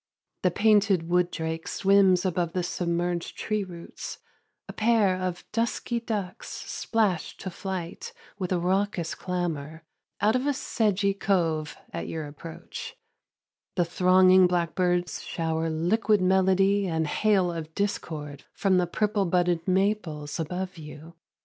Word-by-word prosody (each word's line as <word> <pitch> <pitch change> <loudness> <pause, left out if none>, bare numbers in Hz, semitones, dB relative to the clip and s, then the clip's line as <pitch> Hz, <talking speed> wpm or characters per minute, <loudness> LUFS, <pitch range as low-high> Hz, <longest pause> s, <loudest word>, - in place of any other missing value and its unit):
The 180 - +3
painted 200 -3 +3
wood 180 0 +3
drake 160 -1 -4
swims 195 -2 +4
above 175 -2 0
the 180 - 0
submerged 175 0 -2
tree 215 -2 -1
roots; 175 -3 -8 0.5
a - - -7
pair 215 -4 +3
of 185 -1 -4
dusky 235 +1 -1
ducks 210 -6 -4
splash 210 -7 -1
to 190 - -6
flight, 190 - -5 0.3
with 185 -1 -3
a 180 - +2
raucous 185 -1 0
clamor, 165 -4 -4 0.4
out 215 +3 +3
of 255 +3 0
a 290 - +3
sedgy 205 -5 +1
cove 165 -6 0 0.2
at - - -4
your 160 -2 -4
approach; 160 +3 -8 0.8
the 175 - +2
thronging 185 +1 +5
blackbirds 175 -1 0
shower 160 -1 -2
liquid 200 +7 +2
melody 190 +1 +3
and 160 -2 0
hail 190 +2 +2
of 160 -1 -6
discord 150 -8 -3
from 190 -2 +3
the 180 - +1
purple 210 +2 0
budded 175 -1 +1
maples 185 -6 0
above 180 +2 -4
you. 155 +2 -10
180 Hz, 130 wpm, -27 LUFS, 165-200 Hz, 0.8 s, thronging